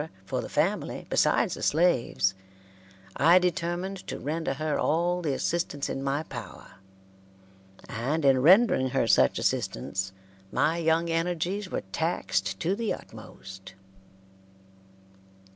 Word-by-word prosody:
for -, -, -2 dB
the -, -, -7 dB
family, -, -, -1 dB
besides -, -, +2 dB
the -, -, -7 dB
slaves, 145 Hz, -, +2 dB, 0.8 s
I 165 Hz, +5 st, +6 dB
determined 180 Hz, +2 st, -1 dB
to -, -, -4 dB
render 155 Hz, -1 st, -3 dB
her 155 Hz, +1 st, -2 dB
all 175 Hz, +3 st, +1 dB
the 145 Hz, -5 st, -1 dB
assistance 165 Hz, -4 st, -2 dB
in 135 Hz, -, -4 dB
my 140 Hz, +2 st, -1 dB
power, 115 Hz, -, -10 dB, 1.1 s
and 140 Hz, +7 st, -2 dB
in 135 Hz, -2 st, +5 dB
rendering 180 Hz, -, +5 dB
her 135 Hz, -2 st, +1 dB
such 65 Hz, -, +4 dB
assistance 95 Hz, +9 st, -2 dB, 0.4 s
my 165 Hz, +2 st, +1 dB
young 165 Hz, +1 st, +1 dB
energies 175 Hz, +4 st, -1 dB
were -, -, -3 dB
taxed 95 Hz, -, -1 dB
to 185 Hz, +4 st, +1 dB
the 225 Hz, 0 st, -2 dB
utmost. 95 Hz, 0 st, -10 dB
160 Hz, 120 wpm, -27 LUFS, 130-175 Hz, 1.1 s, I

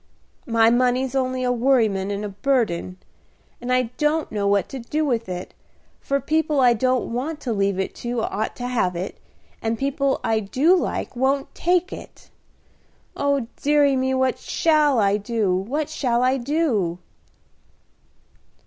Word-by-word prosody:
My 230 Hz, -1 st, +4 dB
money's 250 Hz, +1 st, +1 dB
only 255 Hz, -1 st, -1 dB
a 250 Hz, -, +1 dB
worryment 230 Hz, -6 st, +2 dB
and 205 Hz, +1 st, -3 dB
a -, -, -4 dB
burden, 200 Hz, -5 st, -1 dB, 0.6 s
and 245 Hz, +1 st, -3 dB
I 255 Hz, -2 st, +1 dB
don't 305 Hz, +1 st, +1 dB
know 205 Hz, -2 st, -1 dB
what 200 Hz, -2 st, +2 dB
to 270 Hz, -, -6 dB
do 300 Hz, +6 st, -2 dB
with 235 Hz, -7 st, -1 dB
it, 180 Hz, 0 st, -6 dB, 0.5 s
for 275 Hz, 0 st, -1 dB
people 310 Hz, +1 st, 0 dB
I 245 Hz, -2 st, +6 dB
don't 255 Hz, +1 st, 0 dB
want 295 Hz, +6 st, -3 dB
to 240 Hz, -, -2 dB
leave 200 Hz, -2 st, 0 dB
it 190 Hz, -, -2 dB
to 240 Hz, -1 st, -3 dB
ought 215 Hz, +3 st, -2 dB
to 245 Hz, -, -6 dB
have 220 Hz, -8 st, 0 dB
it, 180 Hz, +3 st, -5 dB, 0.4 s
and 225 Hz, 0 st, -1 dB
people 275 Hz, +1 st, 0 dB
I 225 Hz, -1 st, +1 dB
do 260 Hz, -, +3 dB
like 355 Hz, -, -2 dB
won't 270 Hz, +2 st, 0 dB
take 360 Hz, +1 st, +1 dB
it. -, -, -12 dB, 0.8 s
Oh, 280 Hz, -3 st, 0 dB, 0.2 s
deary 290 Hz, -1 st, +3 dB
me, 260 Hz, 0 st, 0 dB
what 260 Hz, -1 st, +1 dB
shall 305 Hz, -4 st, +2 dB
I 200 Hz, -2 st, +3 dB
do! 210 Hz, -2 st, -1 dB
what 265 Hz, +11 st, -2 dB
shall 245 Hz, -2 st, 0 dB
I 260 Hz, +1 st, +3 dB
do!" 240 Hz, -, 0 dB
250 Hz, 155 wpm, -23 LUFS, 215-275 Hz, 0.8 s, I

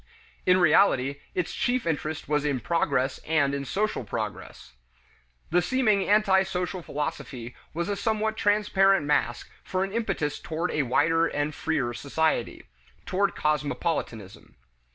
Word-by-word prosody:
In 180 Hz, 0 st, +6 dB
reality 150 Hz, -5 st, +3 dB, 0.2 s
its 180 Hz, -2 st, -1 dB
chief 250 Hz, 0 st, 0 dB
interest 155 Hz, -1 st, -2 dB
was 150 Hz, -1 st, +1 dB
in 145 Hz, -3 st, 0 dB
progress 135 Hz, -4 st, 0 dB
and 145 Hz, -3 st, +1 dB
in 140 Hz, 0 st, -3 dB
social 210 Hz, -3 st, -1 dB
progress. 100 Hz, -, -6 dB, 0.8 s
The 175 Hz, +2 st, +4 dB
seeming 215 Hz, -5 st, +1 dB
antisocial 190 Hz, -3 st, +2 dB
philosophy 140 Hz, -6 st, -5 dB, 0.2 s
was 170 Hz, +2 st, -3 dB
a 205 Hz, -, -1 dB
somewhat 220 Hz, 0 st, 0 dB
transparent 195 Hz, -4 st, +3 dB
mask 120 Hz, -5 st, 0 dB
for 185 Hz, 0 st, -1 dB
an 195 Hz, +1 st, -4 dB
impetus 195 Hz, -10 st, -1 dB
toward 165 Hz, +2 st, -3 dB
a 150 Hz, -, +1 dB
wider 165 Hz, +6 st, +2 dB
and 145 Hz, +1 st, -2 dB
freer 140 Hz, -7 st, -1 dB
society 145 Hz, -1 st, -1 dB, 0.4 s
toward 195 Hz, +1 st, 0 dB
cosmopolitanism. 150 Hz, -, -2 dB
165 Hz, 130 wpm, -26 LUFS, 145-195 Hz, 0.8 s, In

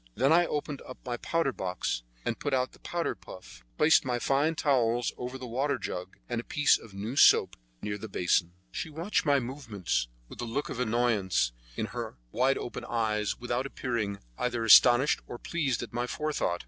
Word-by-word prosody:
Then 135 Hz, +6 st, +4 dB
I 175 Hz, +1 st, +5 dB
opened 145 Hz, -1 st, -3 dB, 0.2 s
my 120 Hz, -1 st, -2 dB
powder 165 Hz, +1 st, 0 dB
box, 90 Hz, -, -2 dB, 0.2 s
and -, -, -2 dB
put 145 Hz, -2 st, 0 dB
out 130 Hz, 0 st, 0 dB
the -, -, -19 dB
powder 170 Hz, -1 st, -2 dB
puff, 90 Hz, -9 st, -13 dB
placed 160 Hz, -, +5 dB
my 125 Hz, -2 st, -1 dB
fine 140 Hz, +6 st, +1 dB
towels 120 Hz, -5 st, +1 dB
over 125 Hz, +1 st, -5 dB
the 130 Hz, -, -7 dB
water 135 Hz, +4 st, 0 dB
jug, 90 Hz, -5 st, -6 dB
and 120 Hz, -1 st, -2 dB
a -, -, -19 dB
piece 145 Hz, +3 st, +3 dB
of 105 Hz, -4 st, -14 dB
new 105 Hz, +6 st, -4 dB
soap -, -, +6 dB, 0.3 s
near 105 Hz, 0 st, -3 dB
the 110 Hz, -, -7 dB
basin. 90 Hz, -2 st, +1 dB, 0.2 s
She -, -, -4 dB
watched 165 Hz, +3 st, -1 dB
my 140 Hz, -1 st, +5 dB
movements 115 Hz, -, -2 dB, 0.2 s
with -, -, -9 dB
a -, -, -2 dB
look 120 Hz, +5 st, -3 dB
of 125 Hz, -, -5 dB
annoyance 110 Hz, -, +1 dB, 0.2 s
in -, -, -1 dB
her -, -, -5 dB
wide 130 Hz, +3 st, +2 dB
open 120 Hz, -, -5 dB
eyes, 105 Hz, -2 st, -1 dB
without 120 Hz, +2 st, -2 dB
appearing 115 Hz, -7 st, -2 dB, 0.2 s
either 120 Hz, -2 st, -1 dB
astonished 120 Hz, +5 st, +7 dB
or 120 Hz, -, -6 dB
pleased 135 Hz, -5 st, -1 dB
at 120 Hz, -, -9 dB
my 120 Hz, +1 st, -1 dB
forethought. 150 Hz, -, -1 dB
120 Hz, 185 wpm, -29 LUFS, 110-140 Hz, 0.3 s, astonished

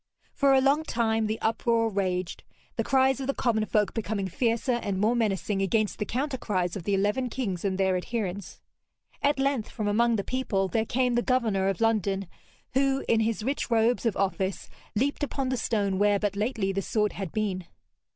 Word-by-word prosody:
For 275 Hz, -1 st, +4 dB
a 265 Hz, -, +5 dB
long 280 Hz, +3 st, +3 dB
time 225 Hz, -5 st, 0 dB
the 220 Hz, +1 st, -2 dB
uproar 230 Hz, 0 st, +1 dB
raged, 185 Hz, -4 st, -2 dB, 0.3 s
the -, -, 0 dB
cries 265 Hz, 0 st, +3 dB
of 265 Hz, -, -4 dB
the 275 Hz, -, 0 dB
common 220 Hz, -4 st, +1 dB
folk 210 Hz, -2 st, +1 dB
becoming 210 Hz, -3 st, -2 dB
fiercer 230 Hz, +6 st, 0 dB
and 195 Hz, -2 st, -2 dB
more 220 Hz, +4 st, +2 dB
menacing 205 Hz, -3 st, 0 dB
against 210 Hz, +2 st, 0 dB
the 210 Hz, -, -2 dB
counter 265 Hz, +2 st, -2 dB
cries 180 Hz, -4 st, -1 dB
of 185 Hz, -4 st, -6 dB
the 200 Hz, -, +1 dB
eleven 210 Hz, +6 st, 0 dB
kings 205 Hz, -8 st, -3 dB
and 190 Hz, -2 st, 0 dB
their 190 Hz, -1 st, +2 dB
adherents. 200 Hz, -1 st, -4 dB, 0.6 s
At 285 Hz, 0 st, +2 dB
length 270 Hz, -4 st, 0 dB
from 215 Hz, -3 st, -3 dB
among 230 Hz, +3 st, +3 dB
the 200 Hz, -, -1 dB
people 210 Hz, -7 st, -1 dB
there 220 Hz, +5 st, 0 dB
came 250 Hz, 0 st, +1 dB
the 240 Hz, -, +2 dB
governor 225 Hz, -7 st, +1 dB
of 195 Hz, 0 st, -1 dB
London, 200 Hz, -4 st, +1 dB, 0.5 s
who, 270 Hz, +1 st, +1 dB
in 225 Hz, -, +3 dB
his 225 Hz, -1 st, 0 dB
rich 270 Hz, +3 st, -2 dB
robes 230 Hz, +1 st, +2 dB
of 220 Hz, -, -1 dB
office, 195 Hz, 0 st, -1 dB, 0.3 s
leaped 280 Hz, +7 st, 0 dB
upon 270 Hz, -2 st, -2 dB
the 260 Hz, -, 0 dB
stone 200 Hz, -5 st, 0 dB
where 205 Hz, 0 st, +4 dB
but 200 Hz, -1 st, -1 dB
lately 210 Hz, -2 st, -1 dB
the 195 Hz, -, -1 dB
sword 210 Hz, 0 st, 0 dB
had 190 Hz, -5 st, -5 dB
been. 195 Hz, -4 st, -2 dB
220 Hz, 195 wpm, -27 LUFS, 195-245 Hz, 0.6 s, a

